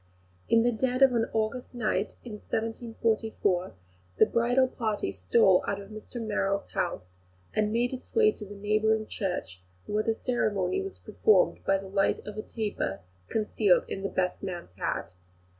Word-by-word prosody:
In 230 0 +5
the 245 - +3
dead 255 +3 +1
of 265 -2 +6
an 230 -1 +2
August 225 +3 -2
night, 215 -3 -1
in 240 - -8
1744, 220 -3 -1 0.4
the - - +7
bridal 245 +3 +3
party 215 - -2
stole 180 - +4
out 200 0 -1
of 200 +1 -11
Mr 215 +3 -8
Merrill's 200 -3 -1
house, 90 - -2 0.4
and 215 0 +1
made 240 +3 +1
its 255 - -9
way 440 -2 +6
to 215 - -10
the 205 0 -9
neighbouring 215 +2 +1
church, 180 - -4 0.2
where 210 +1 0
the 225 +1 0
ceremony 240 - 0
was 390 0 -6
performed 445 +3 +2
by 195 - +3
the 195 0 -8
light 195 +1 +2
of 210 - -7
a 215 - -3
taper 215 - -3 0.3
concealed 210 -3 +2
in 195 - -4
the 195 - -2
best 180 -1 -1
man's 175 - -6
hat. 90 -1 -3
215 Hz, 165 wpm, -28 LUFS, 195-235 Hz, 0.4 s, the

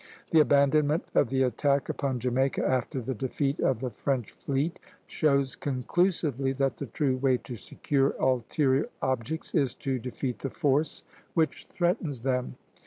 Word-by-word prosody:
The 160 - +6
abandonment 145 +2 +3
of 130 - +3
the 130 +1 +2
attack 140 +2 +1
upon 135 -3 -2
Jamaica, 130 +2 0
after 130 +1 0
the 130 +2 -3
defeat 135 +4 -2
of 125 -3 +1
the 130 -2 -2
French 125 0 -2
fleet, 140 +5 -2 0.3
shows 140 -3 +1
conclusively 140 0 0
that 135 0 0
the 140 - -5
true 130 +2 0
way 130 -1 +2
to 125 - -8
secure 135 +6 0
ulterior 130 - +1
objects 130 +4 -2
is 140 -7 +1
to 135 -2 -2
defeat 125 +1 -4
the 135 - -3
force 150 0 0 0.3
which 160 -2 0
threatens 175 - -1
them. 125 0 -1
135 Hz, 150 wpm, -28 LUFS, 130-145 Hz, 0.3 s, The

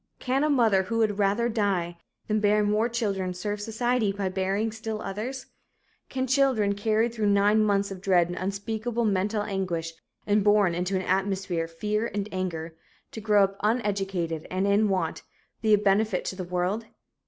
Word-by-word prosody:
Can 265 +2 0
a 305 - +2
mother 230 -9 +4
who 230 +5 -3
would 215 -2 +1
"rather 205 +4 +2
die" 200 -7 0 0.3
than 215 0 +1
bear 210 0 +3
more 210 +3 +1
children 195 -6 -2
serve 205 +3 -3
society 225 0 0
by 195 -1 -2
bearing 195 +4 -1
still 220 0 -5
others? 225 +8 -5 0.6
Can 260 0 -1
children 260 -6 +2
carried 220 +3 +1
through 220 -3 0
nine 205 +2 +4
months 200 -1 +1
of 190 -1 -7
dread 185 -3 +3
and 175 - -5
unspeakable 220 +5 -2
mental 205 +1 0
anguish 180 -5 -3 0.3
and 205 0 +2
born 205 -3 +4
into 180 +3 -1
an 190 - 0
atmosphere 190 -2 -1
of 165 - -13
fear 210 +6 -1
and 205 -1 -2
anger, 170 -3 -4 0.4
to 220 - -7
grow 210 -1 +4
up 195 0 -1
uneducated 195 -7 -1
and 185 +1 -1
in 200 +1 +3
want, 185 -4 -1 0.4
be 220 -2 +2
a 210 - +7
benefit 205 -1 +1
to - - -3
the 185 - -5
world? 180 +5 -1
205 Hz, 175 wpm, -26 LUFS, 190-220 Hz, 0.6 s, a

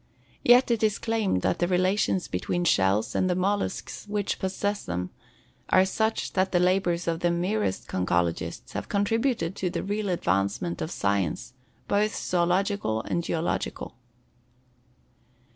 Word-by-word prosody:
Yet 245 +1 +6
it 230 - +1
is 215 -1 +2
claimed 220 - 0
that - - +1
the 175 - +2
relations 185 +1 +1
between 175 0 -2
shells 100 - +2
and 185 - +1
the 180 - +1
mollusks 200 +3 -2
which 205 -1 -2
possess 200 +2 -2
them 90 0 -4 0.6
are 185 0 +5
such 220 +3 -1
that 190 0 +1
the 175 - +3
labors 180 -1 +1
of 165 -1 0
the 175 - +2
merest 175 - -1
conchologists 85 -2 -1
have - - -5
contributed 205 -3 0
to 185 - -1
the - - -3
real 205 +1 -2
advancement 95 - 0
of 155 - -2
science, 100 - -1 0.3
both 210 +2 +1
zoölogical 180 - 0
and 170 - -1
geological. 165 0 -2
185 Hz, 140 wpm, -26 LUFS, 160-205 Hz, 0.6 s, Yet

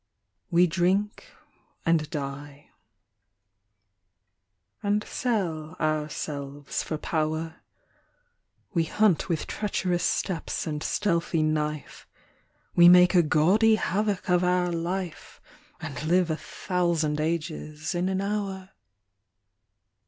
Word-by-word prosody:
We 175 +1 +5
drink 185 +5 0 0.6
and 165 0 +4
the 150 0 -4 2.6
ami 210 +1 +1
sell 170 -10 -2
ourselves 150 -2 -3
1. 155 - -2 0.3
er, 160 0 -5 1.1
We 165 -3 +2
hunt 200 0 +2
with 165 -3 -1
treacherous 185 -4 -1
steps 180 -4 -1
and 150 -2 -3
stealthy 170 -4 0
knife, 150 -1 -2 0.7
We 175 0 +8
make 180 +1 +7
a 180 - +6
gaudy 185 +9 +4
havoc 205 0 -1
of 180 -1 +3
our 180 0 +2
life 175 0 -4 0.4
i 160 - -4
thousand 165 0 0
a 160 +2 +1
zes 155 -1 -6
in 180 +1 0
an 190 0 -1
hour. 195 -2 -3
170 Hz, 95 wpm, -26 LUFS, 155-190 Hz, 2.6 s, We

